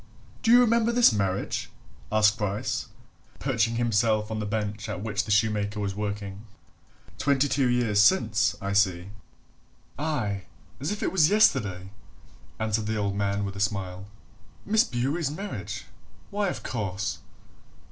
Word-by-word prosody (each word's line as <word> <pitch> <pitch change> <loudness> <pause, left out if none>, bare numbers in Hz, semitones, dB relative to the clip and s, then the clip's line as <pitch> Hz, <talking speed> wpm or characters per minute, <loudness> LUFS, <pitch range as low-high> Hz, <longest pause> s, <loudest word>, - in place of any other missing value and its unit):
"Do 225 - 0
you 240 +1 +8
remember 235 -1 +3
this 235 - +5
marriage?" 100 -2 -1 0.4
asked 110 0 +4
Bryce, 105 0 -2 0.5
perching 115 +2 0
himself 110 -2 +1
on 110 - -2
the 105 - -3
bench 105 +1 -3
at 105 -1 -4
which 110 -1 -1
the - - -9
shoemaker 105 0 +1
was 100 -1 -2
working. 100 0 -5 0.7
"Twenty 140 0 +2
two 135 -2 +1
years 115 -4 +2
since, 110 - +3
I 100 0 -3
see." 95 -2 +1 0.9
"Aye, 120 - -2 0.3
as 145 +7 -2
if 210 - -3
it - - 0
was 165 -4 +4
yesterday!" 105 - +2 0.7
answered 110 -1 -1
the 110 0 -1
old 100 -1 -1
man 100 0 -1
with 100 0 -5
a - - -6
smile. 95 -2 -2 0.6
"Miss 220 +2 +4
Bewery's 140 - -1
marriage? 195 +8 -6 0.5
why, 205 0 0
of - - -4
course!" 100 -4 -3
110 Hz, 145 wpm, -26 LUFS, 100-135 Hz, 0.9 s, you